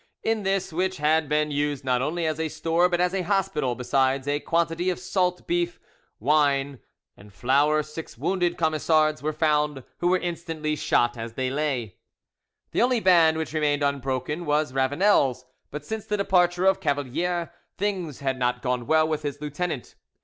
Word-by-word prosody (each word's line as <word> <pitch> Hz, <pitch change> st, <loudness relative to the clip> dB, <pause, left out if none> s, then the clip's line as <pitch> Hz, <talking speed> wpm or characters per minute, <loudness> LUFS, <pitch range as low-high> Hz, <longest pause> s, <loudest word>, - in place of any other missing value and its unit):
In 225 Hz, -1 st, 0 dB
this, 195 Hz, -3 st, -1 dB
which 185 Hz, +2 st, -1 dB
had 155 Hz, 0 st, +2 dB
been 150 Hz, 0 st, +1 dB
used 145 Hz, -1 st, -1 dB
not 125 Hz, -1 st, +1 dB
only 165 Hz, +5 st, -1 dB
as 155 Hz, 0 st, -1 dB
a 160 Hz, -1 st, -1 dB
store 165 Hz, +3 st, +1 dB
but 175 Hz, -1 st, 0 dB
as 180 Hz, +1 st, +1 dB
a 195 Hz, -, 0 dB
hospital, 175 Hz, -9 st, 0 dB
besides 130 Hz, +2 st, 0 dB
a 145 Hz, 0 st, +1 dB
quantity 170 Hz, +2 st, 0 dB
of 180 Hz, -, -1 dB
salt 180 Hz, -1 st, -1 dB
beef, 175 Hz, 0 st, -1 dB, 0.4 s
wine, 140 Hz, 0 st, +2 dB, 0.4 s
and 100 Hz, +1 st, -16 dB
flour, 145 Hz, +8 st, +2 dB
six 155 Hz, +2 st, -9 dB
wounded 175 Hz, -2 st, 0 dB
Camisards 155 Hz, -1 st, +2 dB
were 155 Hz, +1 st, -1 dB
found, 150 Hz, -3 st, 0 dB, 0.2 s
who 175 Hz, -, +1 dB
were 185 Hz, +1 st, +4 dB
instantly 165 Hz, -3 st, -3 dB
shot 120 Hz, -4 st, +1 dB
as 115 Hz, 0 st, -6 dB
they 130 Hz, +1 st, -2 dB
lay. 135 Hz, -8 st, -2 dB, 0.7 s
The -, -, +1 dB
only 245 Hz, 0 st, +3 dB
band 170 Hz, -5 st, +5 dB
which 160 Hz, -1 st, -4 dB
remained 150 Hz, -2 st, +1 dB
unbroken 140 Hz, +3 st, -2 dB
was 150 Hz, -2 st, +1 dB
Ravanel's, 135 Hz, -, +2 dB, 0.2 s
but 150 Hz, 0 st, -7 dB
since 220 Hz, +4 st, -5 dB
the 210 Hz, -, 0 dB
departure 180 Hz, -2 st, +2 dB
of 190 Hz, -1 st, +4 dB
Cavalier 165 Hz, +5 st, -1 dB, 0.2 s
things 185 Hz, -9 st, -3 dB
had 135 Hz, -1 st, -1 dB
not 125 Hz, 0 st, 0 dB
gone 125 Hz, -2 st, -1 dB
well 155 Hz, 0 st, +4 dB
with 155 Hz, -1 st, -2 dB
his 145 Hz, -1 st, -4 dB
lieutenant. 150 Hz, -1 st, -4 dB
155 Hz, 170 wpm, -25 LUFS, 140-175 Hz, 0.7 s, band